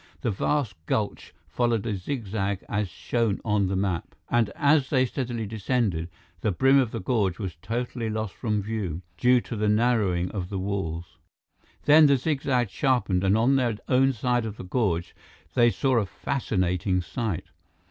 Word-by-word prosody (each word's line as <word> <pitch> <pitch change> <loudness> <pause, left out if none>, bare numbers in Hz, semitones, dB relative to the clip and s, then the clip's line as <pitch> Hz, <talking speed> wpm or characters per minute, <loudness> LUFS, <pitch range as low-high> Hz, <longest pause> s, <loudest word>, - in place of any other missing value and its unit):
The 115 - 0
vast 100 - -1
gulch 105 -2 -2 0.2
followed 120 -4 0
a 110 - -1
zigzag 100 -3 -3
as 105 -2 -1
shown 115 +3 -1
on 105 -3 +2
the 95 - -1
map, 95 -5 -2 0.2
and 120 -3 +3
as 145 -3 +3
they 130 -2 +3
steadily 120 -3 -3
descended, 105 -5 -1 0.3
the 110 - 0
brim 135 +8 +4
of 130 -4 +2
the - - -4
gorge 100 -3 0
was 95 -5 -5
totally 115 +1 -3
lost 110 -2 -3
from 105 -4 -1
view, 95 -6 -3
due 125 +6 +4
to 120 - -6
the 105 0 +1
narrowing 105 -6 +2
of 95 -3 -4
the 100 - -3
walls. 95 -4 -4 0.6
Then, 150 +1 +7
the 140 -1 +4
zigzag 130 -5 0
sharpened, 120 -9 +1
and 95 +2 +3
on 130 +5 +3
their 120 -5 0
own 135 +1 +4
side 120 -1 0
of 105 0 -7
the - - -7
gorge, 90 -5 -1 0.4
they 120 -2 +5
saw 130 +1 +1
a 105 - -1
fascinating 90 -6 -1
sight. 105 -2 -3
110 Hz, 170 wpm, -26 LUFS, 95-125 Hz, 0.6 s, Then